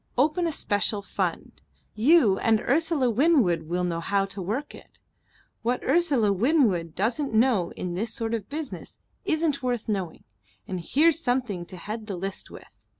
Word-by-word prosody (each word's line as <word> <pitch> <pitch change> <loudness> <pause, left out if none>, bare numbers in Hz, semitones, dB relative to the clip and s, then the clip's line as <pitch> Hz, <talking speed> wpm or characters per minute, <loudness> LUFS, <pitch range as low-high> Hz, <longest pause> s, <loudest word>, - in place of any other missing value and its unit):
Open 310 +6 +2
a - - -1
special 205 -5 -1
fund. - - -4 0.3
You 230 - +4
and 225 -1 +3
Ursula 300 0 +1
Winwood 225 - +2
will 180 +1 0
know 170 -2 -1
how 195 +3 0
to 195 0 -8
work 225 +11 -3
it. - - -15 0.6
What 245 +2 -1
Ursula 275 -9 +2
Winwood 195 - +1
doesn't 230 +6 -1
know 220 -7 +3
in 180 -1 -5
this 220 +6 -2
sort 230 -2 -2
of 220 -4 -3
business 300 -1 -6 0.3
isn't 315 -3 0
worth 245 -3 -2
knowing 190 -6 -3 0.4
and 185 - -4
here's 300 - +3
something 245 - -1
to 185 - -9
head 215 +4 -6
the 200 - -4
list 195 +2 -5
with." - - -12
225 Hz, 160 wpm, -26 LUFS, 195-280 Hz, 0.6 s, You